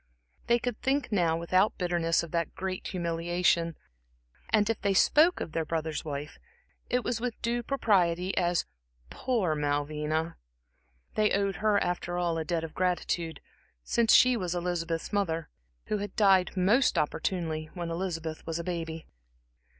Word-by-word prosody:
They 235 - +4
could 245 -2 -4
think 270 -2 0
now 170 -5 +2
without 185 +5 +2
bitterness 175 -3 +1
of 170 - -8
that 170 -2 -2
great 185 0 -4
humiliation, 170 -1 0 0.7
and 210 -2 +3
if 225 -1 -1
they 200 -1 +1
spoke 320 - +5
of - - -5
their 165 0 -1
brother's 160 -1 -3
wife, 145 0 -6 0.5
it 250 0 +1
was 235 -2 -2
with 245 -2 -3
due 240 +1 0
propriety 190 -8 +1
as 175 -1 +1 0.5
"poor 225 -11 0
Malvina." 150 +2 -1 0.8
They 215 -1 +2
owed 195 -2 0
her 210 +1 +2
after 175 0 -2
all, 170 -2 0
a - - -1
debt 165 +1 -1
of 160 - -6
gratitude, 175 -2 -1 0.4
since 230 - +2
she 255 0 +7
was 180 -5 -2
Elizabeth's 170 0 -2
mother, 165 -6 -1 0.4
who 210 - -1
had 205 -1 -5
died 195 -3 +4
most 210 +9 +3
opportunely 155 0 -1
when 170 -2 -4
Elizabeth 165 -3 -4
was 165 0 -2
a 170 - -4
baby. 165 -2 -4
175 Hz, 150 wpm, -29 LUFS, 165-205 Hz, 0.8 s, she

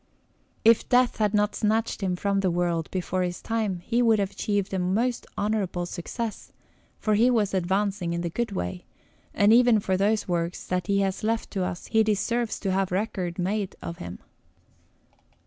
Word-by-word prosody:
If 230 0 +5
death 250 0 +3
had 210 -1 +1
not 210 0 +2
snatched 220 +1 0
him 185 -2 0
from 200 +2 0
the 190 -1 +1
world 170 -2 0
before 185 0 -2
his 180 -1 -2
time, 215 -6 -2
he 235 +6 0
would 225 -2 +4
have 200 -1 -1
achieved 200 -1 -2
a 190 - 0
most 225 +7 0
honourable 200 -4 -1
success, 210 +6 -5 0.5
for 215 - 0
he 230 +4 +4
was 215 -5 +1
advancing 190 -1 0
on 170 - -2
the 170 -1 -3
good 235 +3 -2
way; 90 - -4 0.5
and 205 +2 +4
even 240 -2 +6
for 190 -2 0
those 210 +3 +1
works 175 -1 -2
that 180 -1 -2
he 200 0 +2
has 195 +1 -1
left 225 +1 -1
to 190 -3 -1
us, 175 -1 -4
he 220 - +3
deserves 220 +2 0
to 195 - -1
have 190 0 0
record 185 -3 -2
made 195 +2 -1
of 170 - -7
him. 85 0 -7
200 Hz, 180 wpm, -26 LUFS, 180-220 Hz, 0.5 s, even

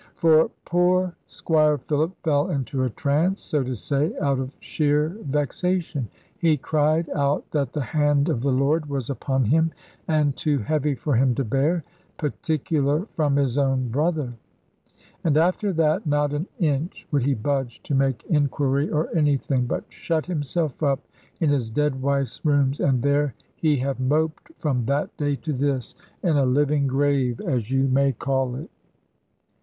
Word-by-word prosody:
For 160 -1 +4 0.2
poor 180 +1 +2
Squire 155 -2 +2
Philip 155 +6 -1
fell 145 -3 +2
into 130 -1 -1
a 130 - +1
trance, 155 - 0
so 150 -3 0
to 130 0 -3
say, 140 +7 -1
out 140 -2 +1
of 130 +1 -5
sheer 150 0 +1 0.2
vexation. 150 0 -1 0.3
He 160 -3 +3
cried 155 +3 +1
out 140 0 0
that 140 -5 -1
the 150 - -1
hand 145 0 +2
of 115 - 0
the 140 +1 +1
Lord 145 +4 +1
was 140 -2 -3
upon 135 -1 0
him, 160 +8 +3 0.4
and 150 -3 +2
too 150 -2 0
heavy 150 +3 0
for 145 0 -1
him 125 +1 +3
to 135 - 0
bear 145 +8 +1 0.3
particular 150 +1 0
from 150 -4 +2
his 140 -1 +1
own 135 -2 +1
brother. 150 0 0 0.9
And 155 -3 +2
after 185 +5 +2
that 160 +3 +1
not 145 0 +1
an 150 +6 -2
inch 155 -1 -1
would 145 -2 +2
he 135 +2 +1
budge 130 +1 -2
to - - -4
make 135 -2 +1
inquiry 145 -1 +1
or 155 +2 -1
anything, 140 -4 +1
but - - -2
shut 160 -2 -2
himself 155 -3 -2
up 140 -2 +1 0.3
in 155 -4 +2
his 130 -6 0
dead 135 +2 0
wife's 140 -1 -1
rooms, 145 -2 +2
and 130 -3 +2
there 140 -2 +1 0.2
he 155 -3 +2
have 135 +1 -2
moped 155 - 0
from 130 -6 -1
that 140 +2 -1
day 145 -1 0
to 155 +2 -4
this, 135 -2 -1 0.3
in 165 -5 +2
a 140 - +3
living 140 +2 +2
grave, 135 -3 +1
as 120 -4 -1
you 135 0 +2
may 135 +1 +3
call 130 0 -1
it." 150 +6 -8
145 Hz, 165 wpm, -24 LUFS, 135-155 Hz, 0.9 s, For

